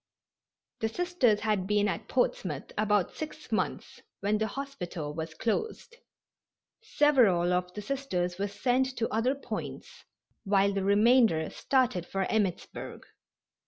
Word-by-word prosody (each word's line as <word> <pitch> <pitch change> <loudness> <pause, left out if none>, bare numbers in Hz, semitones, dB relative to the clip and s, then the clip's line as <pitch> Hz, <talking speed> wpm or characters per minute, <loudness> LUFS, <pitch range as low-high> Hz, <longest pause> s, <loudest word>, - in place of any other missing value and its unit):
The 220 - 0
Sisters 260 -8 +1
had 210 -4 0
been 210 0 +2
at 205 +1 -3
Portsmouth 180 - -1
about 210 -3 +1
six 310 -1 -7
months - - -2 0.2
when 210 +1 +1
the 220 - 0
hospital 180 - -5
was 160 +1 -5
closed. 445 - -3 0.8
Several 240 - +3
of 180 0 -1
the 210 - -5
Sisters 185 -9 -2
were 200 - 0
sent 250 +6 0
to 230 - 0
other 240 +5 +1
points, 280 - -7 0.4
while 200 -1 +3
the 195 -1 -1
remainder 205 -4 +4
started 245 -10 +1
for 195 0 -1
Emmittsburg. 205 -5 -2
210 Hz, 125 wpm, -29 LUFS, 185-255 Hz, 0.8 s, remainder